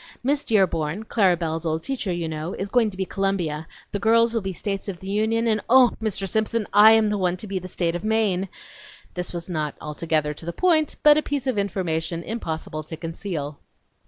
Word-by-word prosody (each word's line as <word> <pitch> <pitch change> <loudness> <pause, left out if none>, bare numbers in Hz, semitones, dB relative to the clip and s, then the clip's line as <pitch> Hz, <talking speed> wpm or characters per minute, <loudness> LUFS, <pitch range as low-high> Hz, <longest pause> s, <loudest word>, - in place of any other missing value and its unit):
Miss 285 +3 +1
Dearborn 190 -3 +1
Clara 190 -6 +3
Belle's 165 -1 -3
old 160 -1 -1
teacher, 255 -8 -2
you 175 -2 -2
know 160 +2 -4
is 200 - -4
going 235 -1 +3
to 190 - -10
be 190 - -1
Columbia; 175 -6 -2 0.2
the 205 - -2
girls 230 +2 +4
will 230 - 0
be 195 - -3
the 185 - -5
States 200 0 -3
of 180 -3 -6
the 190 - -10
Union, 220 +3 +1
and 215 -2 +1
oh, 255 -1 +7
Mr. 205 -3 -1
Simpson, 220 +2 0
I 210 +2 +8
am 220 -1 +3
the 205 - -1
one 180 -1 +1
to 200 - -6
be 195 -2 -3
the 185 - -8
State 170 -2 -1
of 175 - -4
Maine!" 210 -4 +1 0.6
(This 180 -1 -4
was 170 -1 -5
not 155 -5 -2
altogether 150 0 -1
to 155 - -11
the 170 - -3
point, 315 - +2
but 300 0 +7
a - - -1
piece 285 -3 -3
of 255 -6 0
information 170 -4 -2
impossible 160 -8 -4
to 160 +1 -7
conceal.) 165 -3 -5
190 Hz, 215 wpm, -24 LUFS, 165-220 Hz, 0.6 s, I